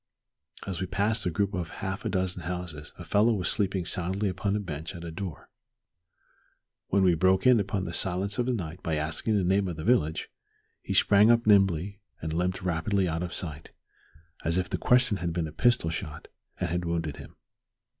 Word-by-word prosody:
As 95 -1 -4
we 95 - -2
passed 105 +2 +1
a - - +2
group 100 +4 -1
of 90 -4 -3 0.2
half 95 +1 -3
a - - 0
dozen 95 -2 -1
houses 85 -3 -5
a - - -8
fellow 110 +3 +3
was 90 -3 -1
sleeping 95 -3 0
soundly 95 +4 -1
upon 100 +2 -1
a - - +1
bench 80 -2 -6
at 85 - -8
a 85 - -6
door. 85 -3 -7 1.4
When 100 0 +2
we 90 -2 +5
broke 95 +5 +3
in 125 -3 +6
upon 100 -1 -1
the 85 - -5
silence 95 +5 -1
of 120 - +1
night 90 -9 -3
by 80 - -1
asking 80 +8 0
the 95 - +1
name 95 +2 +2
of 85 - -4
the 80 - -6
village, 80 -9 +1 0.5
he - - -3
sprang 105 +2 +5
up 115 0 +4
nimbly 100 -2 +3 0.2
and 80 0 -4
limped 90 +3 -1
rapidly 90 +2 0
out 80 0 -2
of 90 -1 -3
sight 75 -3 -5 0.7
as 85 +1 +1
if 90 -1 -1
the - - -1
question 125 -4 +3
had 85 -2 -3
been 85 -2 -1
a - - -8
pistol 85 +1 +2
shot 75 -1 -6 0.3
and 90 -2 -1
had 90 +1 -1
wounded 85 -3 -2
him. - - -11
90 Hz, 200 wpm, -28 LUFS, 85-100 Hz, 1.4 s, in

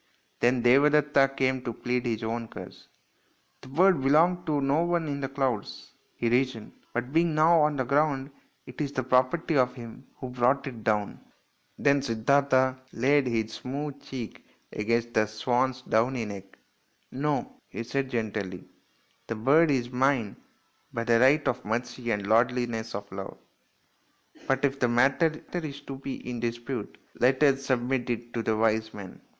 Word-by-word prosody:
Then 120 0 +2
Devadetta 140 +2 +4
came 130 -1 +1
to 120 -2 -4
plead 125 +2 -2
his 115 -1 -2
own 115 +1 -3
cause. - - -11 0.4
" - - -41
The - - -12
bird 170 +3 +3
belonged 170 +6 +3
to 150 -2 +1
no 140 +3 +2
one 170 -2 0
in 140 -1 -3
the 135 - -3
clouds," 135 -6 -3 0.2
he 120 - -2
reasoned, 120 -2 0
" - - -35
but 125 +3 -3
being 165 -1 +2
now 160 +2 +5
on 150 0 +2
the 130 - 0
ground 140 +1 +1 0.3
it - - -8
is 140 -2 -2
the 130 -2 -2
property 130 +6 +1
of 125 -2 +2
him 120 +1 -11
who 130 - -7
brought 125 +2 +1
it 120 -5 -7
down." 105 -2 0 0.6
Then 140 0 +3
Siddartha 130 +2 +2 0.2
laid 135 +3 +2
his 110 -2 -1
smooth 140 +2 -5
cheek 130 -5 -7 0.3
against 115 +2 -1
the 110 -1 +2
swan's 125 +4 -1
downy 120 +1 +1
neck. 100 -2 -9 0.3
" - - -42
No," 150 - -2
he 115 - -5
said 135 +3 -2
gently, 105 -6 -4 0.3
" - - -39
the 115 - -3
bird 145 +9 +4
is 125 -3 0
mine 125 -4 +1 0.6
by 115 - -3
right 130 +6 +4
of 125 +1 -1
mercy 120 +2 -3
and 105 -3 0
the - - -5
lordliness 115 -1 +1
of 100 0 -7
love; 95 0 -7 1.1
but 135 +1 +2
if 135 0 -1
the 125 - +3
matter 130 +7 +3 0.2
is 155 -5 -4
to 140 -1 -7
be 135 -1 -7
in 120 -1 -4
dispute 120 0 -4 0.2
let 130 +3 +3
us 135 -1 +3
submit 125 0 0
it 120 0 -4
to 115 - -1
the 110 -1 0
wise 110 0 +1
men." 100 -3 -10
130 Hz, 170 wpm, -27 LUFS, 115-140 Hz, 1.1 s, now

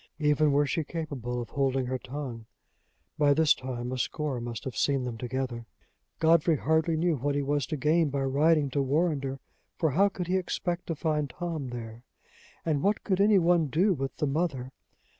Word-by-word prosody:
Even 150 0 +3
were 145 +1 +3
she 160 +3 -1
capable 140 -7 -4
of - - -14
holding 135 -2 0
her 130 +1 -2
tongue, 125 -4 -7 0.7
by 145 -1 +4
this 160 -1 +5
time 125 -1 -5
a 130 - -3
score 140 -2 -2
must 120 -1 -5
have 130 -4 -5
seen 140 -2 +1
them 125 -2 -4
together." 120 -1 -4 0.5
Godfrey 165 0 +4
hardly 160 +3 +1
knew 165 -1 +1
what 140 +3 -1
he 145 - 0
was 145 -1 0
to 155 - -3
gain 155 +3 +2
by 140 0 -1
riding 145 +1 +3
to 140 - +1
Warrender, 140 -1 0 0.4
for 160 -3 +1
how 195 +8 +4
could 185 -2 -5
he 185 +2 +1
expect 175 -1 -3
to 165 - -2
find 150 -2 -1
Tom 160 -4 -4
there? 115 -1 -7 0.6
and 155 -4 +1
what 205 +5 +1
could 195 -1 +1
any 205 0 +5
one 170 -3 +3
do 185 +8 +2
with 135 -4 -4
the - - 0
mother? 140 -4 -1
145 Hz, 190 wpm, -28 LUFS, 130-165 Hz, 0.7 s, this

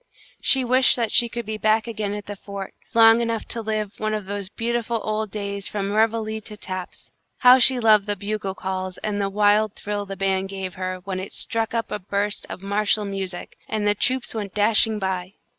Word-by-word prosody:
She 265 -2 +3
wished 255 +2 +4
that 230 -3 -1
she 240 -1 +5
could 235 0 -5
be 215 0 -4
back 215 +1 +2
again 215 -3 -3
at 205 -1 -7
the 205 - -6
fort, 200 0 -8 0.2
long 225 0 +7
enough 230 -1 -2
to 230 - -3
live 215 -2 -2
one 215 0 -1
of 210 -2 -4
those 200 -1 -4
beautiful 235 0 -2
old 215 0 -2
days 200 -1 -4
from 200 -1 -3
reveille 220 0 +1
to 210 0 -10
taps. 185 -2 -7 0.3
How 250 +1 +7
she 255 0 +6
loved 215 -3 +4
the 205 - +1
bugle 200 -1 -3
calls 185 -1 -4
and 205 -1 -2
the 195 - 0
wild 210 +1 +3
thrill 205 -1 -4
the 195 0 -6
band 195 0 0
gave 190 -2 -5
her, 185 0 -4
when 190 -1 -4
it 190 - -7
struck 225 0 -2
up 230 - -2
a - - -2
burst 205 +2 -2
of 185 - -8
martial 210 +1 +1
music, 190 -2 -6
and 215 -1 -1
the 205 - +4
troops 255 +4 +1
went 205 -4 -5
dashing 215 +1 +4
by! 190 -1 -3
210 Hz, 210 wpm, -23 LUFS, 195-225 Hz, 0.3 s, long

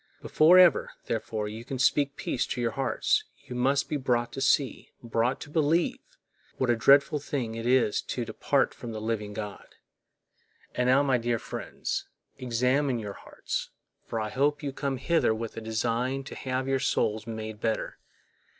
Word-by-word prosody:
Before 165 +4 +5
ever, 180 -3 +5
therefore, 110 -2 -2
you 110 +2 -7
can 135 +2 -5
speak 140 +2 +2
peace 125 - -2
to - - -3
your 120 -1 0
hearts, 135 +3 +1 0.2
you - - -8
must 135 +3 +2
be 150 - -1
brought 120 -3 0
to 135 - -6
see, 135 0 +1
brought 120 +3 0
to 150 - -8
believe, 160 +2 +2 0.6
what 130 -2 +2
a - - +3
dreadful 140 +5 +5
thing 135 -5 -3
it 115 +1 -4
is 125 -4 +3
to - - -4
depart - - +1
from 115 -2 -8
the 110 - -4
living 105 -1 -2
God.And 105 +3 -8
now, 135 +2 +5
my 130 -3 +2
dear 120 0 0
friends, - - -5 0.3
examine 125 +2 +1
your 105 -3 -5
hearts, - - -5 0.3
for 115 - -4
I 110 -1 -2
hope 145 +5 0
you 140 -2 -3
came 135 -1 -2
hither 135 -4 +2
with 115 0 -5
a 115 - -5
design 115 +4 -1
to - - -9
have 130 0 -2
your 135 0 +1
souls 110 -3 0
made 110 -1 -6
better. 110 -1 -2
125 Hz, 170 wpm, -28 LUFS, 115-135 Hz, 0.6 s, Before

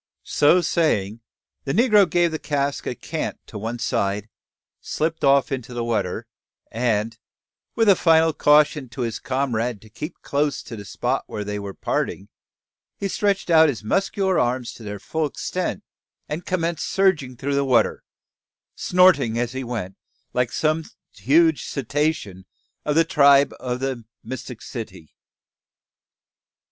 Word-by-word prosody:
So 160 +5 +4
saying, 120 - 0 0.4
the 135 - -2
negro 210 -4 +5
gave 170 +1 +2
the 155 - -3
cask 140 -1 -2
a 125 - -2
"cant" - - -4
to - - -8
one 115 +3 -4
side, 100 -1 -1 0.5
slipped 160 +1 -2
off 140 +2 +4
into 125 -2 -4
the 120 - -2
water; 115 -1 -2 0.5
and, 115 -1 0 0.6
with 225 -1 +2
a 200 - +7
final 160 -2 +4
caution 150 -2 +3
to 130 - -7
his 115 -2 -2
comrade 125 -4 -1
to 110 - -17
keep 150 - -7
close 145 0 -1
to 115 - -8
the 100 -2 -9
spot 125 +7 -2
where 105 - -5
they 105 0 -4
were 100 -1 -7
parting, 100 - -2 0.7
he 200 - -2
stretched 195 -2 0
out 160 -1 +7
his 115 -6 -4
muscular 190 - +1
arms 125 0 -1
to - - -14
their 105 -1 -6
full 155 +10 -2
extent, 185 +6 -3 0.4
and 155 +4 -5
commenced 170 -3 -1
surging 160 -11 +1
through 140 +3 -2
the 140 0 +2
water, 130 -3 +2 0.7
snorting 175 -11 +3
as 120 0 -1
he 130 0 -4
went 110 -6 -5 0.4
like 125 -2 0
some 155 +1 0 0.3
huge 160 +4 +3
cetacean 140 - -2 0.4
of 150 - 0
the 165 +1 +5
tribe 140 -3 +5
of 125 -1 -3
the 135 -3 -3 0.2
Mysticeti. 125 -2 -8 0.4
CHAPTER - - -40
FORTY. - - -49
140 Hz, 150 wpm, -23 LUFS, 115-160 Hz, 0.7 s, a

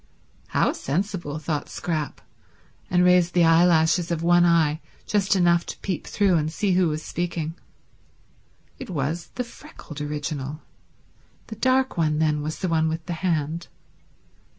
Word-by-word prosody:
How - - +2
sensible, 170 -1 -3
thought 155 -1 -3
Scrap; 155 -4 -3 0.7
and 180 0 +3
raised 180 -1 +4
the 175 -2 +5
eye 165 +1 +6
lashes 165 0 +3
of 165 -1 -2
one 175 0 +5
eye 160 -2 +2 0.2
just 200 -1 +1
enough 175 -2 +3
to - - -6
peep 185 -4 -3
through 195 -4 +2
and 155 0 -1
see 200 +4 0
who 180 -1 +3
was 155 0 -3
speaking. 170 -2 -3 1.3
It 260 - -8
was 160 +1 -2
the 250 - -1
freckled 235 - -11
original. 150 0 -4 0.8
The 220 - -8
dark 260 +2 +1
one, 155 -2 +1
then, 150 -1 +1
was 155 +1 -4
the 185 - -2
one 160 -1 +2
with 160 0 -4
the 175 - -3
hand. 165 -2 -1
170 Hz, 150 wpm, -24 LUFS, 155-180 Hz, 1.3 s, eye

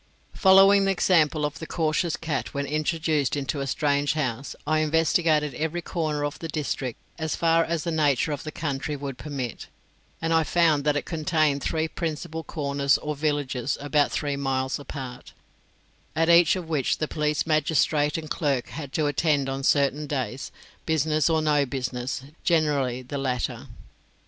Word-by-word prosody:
Following 195 +1 +6
the 195 - +3
example 160 -5 +2
of 150 -1 -4
the 160 - -7
cautious 160 0 0
cat 155 -5 -4
when 140 0 -1
introduced 155 -1 0
into 140 0 -2
a 135 - -3
strange 145 +1 +1
house, 135 -4 -3
I 155 +1 +2
investigated 155 -1 +2
every 160 +5 -3
corner 155 -4 -2
of 145 - -5
the 165 - -5
district 140 -5 -3 0.2
as 160 -1 -1
far 165 0 +3
as 165 -2 -2
the 170 - -2
nature 150 -2 +2
of 145 - -3
the 155 - -6
country 145 -1 -3
would 135 -3 -6
permit; 135 -6 -5 0.5
and 165 0 0
I 160 0 +4
found 155 -3 +2
that 150 -1 +2
it - - -3
contained 155 -3 +1
three 160 +2 -1
principal 160 0 -4
corners 140 -3 +1
or 150 0 -4
villages 145 -4 -1
about 145 0 +1
three 145 -2 -1
miles 130 -1 -1
apart, 130 -3 -8 0.8
at 165 +1 +2
each 170 0 +6
of 180 -3 -5
which 150 -5 0
the 155 - -2
police 150 -1 -1
magistrate 155 -1 +2
and 160 -1 -6
clerk 140 -5 -1
had 140 -2 -7
to 155 - +1
attend 145 -1 +1
on 135 0 -3
certain 140 +2 +2
days, 130 -3 -3 0.4
business 155 -1 +2
or 160 -1 +2
no 150 -2 +3
business, 130 0 -3 0.2
generally 145 -7 +1
the 140 +3 -5
latter. 125 -3 -2
150 Hz, 165 wpm, -25 LUFS, 140-160 Hz, 0.8 s, Following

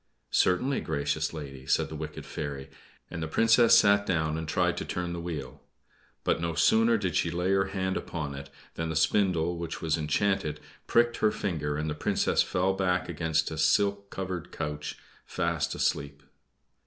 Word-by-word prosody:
"Certainly, 125 +10 +2
gracious 75 0 -1
lady," 70 -4 -8
said - - +2
the 80 - -7
wicked 75 0 -6
fairy, 70 -2 -6 0.4
and 85 - -5
the 80 - -2
Princess 115 +6 +5
sat 100 0 +5
down 80 -5 0
and 80 0 -4
tried 80 - +1
to - - -2
turn 90 -1 -3
the 85 - -4
wheel. 75 -7 -6 0.6
But - - +1
no 85 -1 -2
sooner 115 +7 +4
did 95 -6 -2
she 85 - +2
lay 90 +3 -1
her 95 0 +3
hand 95 -1 -2
upon 75 -4 -4
it 70 0 -8 0.2
than 80 0 -3
the 80 - -3
spindle, 85 0 +2
which 85 -1 -5
was 80 0 0
enchanted, 75 0 0 0.3
pricked 120 0 +3
her 110 - +3
finger, 75 -8 -2
and 75 0 -2
the 75 - -1
Princess 75 - +1
fell 95 +1 +1
back 90 -2 0
against 80 -1 0
a 80 - -5
silk 100 +4 +2
covered 90 -3 -5
couch 75 -1 -4 0.3
fast 85 -3 -1
asleep. 70 0 -1
85 Hz, 175 wpm, -28 LUFS, 75-95 Hz, 0.6 s, Princess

